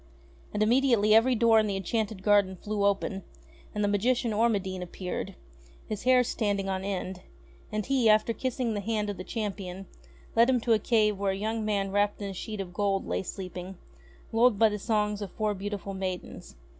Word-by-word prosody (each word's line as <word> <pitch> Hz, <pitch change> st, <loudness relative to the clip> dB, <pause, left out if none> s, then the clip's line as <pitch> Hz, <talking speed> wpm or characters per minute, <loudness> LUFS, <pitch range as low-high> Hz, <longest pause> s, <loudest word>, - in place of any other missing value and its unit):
And 210 Hz, 0 st, +1 dB
immediately 235 Hz, -2 st, +4 dB
every 240 Hz, +3 st, +5 dB
door 225 Hz, -1 st, +5 dB
in 215 Hz, -, +1 dB
the 200 Hz, -, -1 dB
enchanted 205 Hz, +1 st, -2 dB
garden 205 Hz, -2 st, +3 dB
flew 205 Hz, +2 st, -3 dB
open, 195 Hz, -1 st, 0 dB, 0.5 s
and 210 Hz, -, 0 dB
the -, -, +2 dB
magician 230 Hz, +3 st, +1 dB
Ormadine 200 Hz, -4 st, 0 dB
appeared, 180 Hz, +1 st, -5 dB, 0.5 s
his 215 Hz, +1 st, -5 dB
hair 255 Hz, -1 st, +5 dB
standing 205 Hz, -4 st, -1 dB
on 190 Hz, -1 st, -2 dB
end; 190 Hz, -2 st, -4 dB, 0.5 s
and 215 Hz, -1 st, -2 dB
he, 260 Hz, -4 st, +3 dB
after 215 Hz, +2 st, +4 dB
kissing 250 Hz, -2 st, -2 dB
the 205 Hz, -, -2 dB
hand 210 Hz, 0 st, -1 dB
of 200 Hz, -, -8 dB
the 185 Hz, -, -6 dB
champion, 195 Hz, -3 st, -5 dB, 0.5 s
led 230 Hz, +2 st, +5 dB
him 255 Hz, -1 st, +3 dB
to 230 Hz, 0 st, +3 dB
a 220 Hz, -, +3 dB
cave 210 Hz, -2 st, +2 dB
where 200 Hz, -1 st, +1 dB
a -, -, -4 dB
young 220 Hz, +2 st, -2 dB
man 200 Hz, -2 st, -1 dB
wrapped 205 Hz, +1 st, +1 dB
in 200 Hz, -1 st, -4 dB
a -, -, -7 dB
sheet 215 Hz, +3 st, -6 dB
of 180 Hz, -2 st, -8 dB
gold 195 Hz, 0 st, 0 dB
lay -, -, -1 dB
sleeping, 185 Hz, -1 st, -7 dB, 0.5 s
lulled 230 Hz, -1 st, +4 dB
by 225 Hz, +1 st, +5 dB
the 210 Hz, 0 st, -4 dB
songs 210 Hz, -1 st, 0 dB
of 200 Hz, -, -4 dB
four 215 Hz, -1 st, 0 dB
beauti 205 Hz, +1 st, -4 dB
ful 195 Hz, -, -7 dB
maidens. 185 Hz, -, -5 dB
205 Hz, 195 wpm, -28 LUFS, 195-225 Hz, 0.5 s, every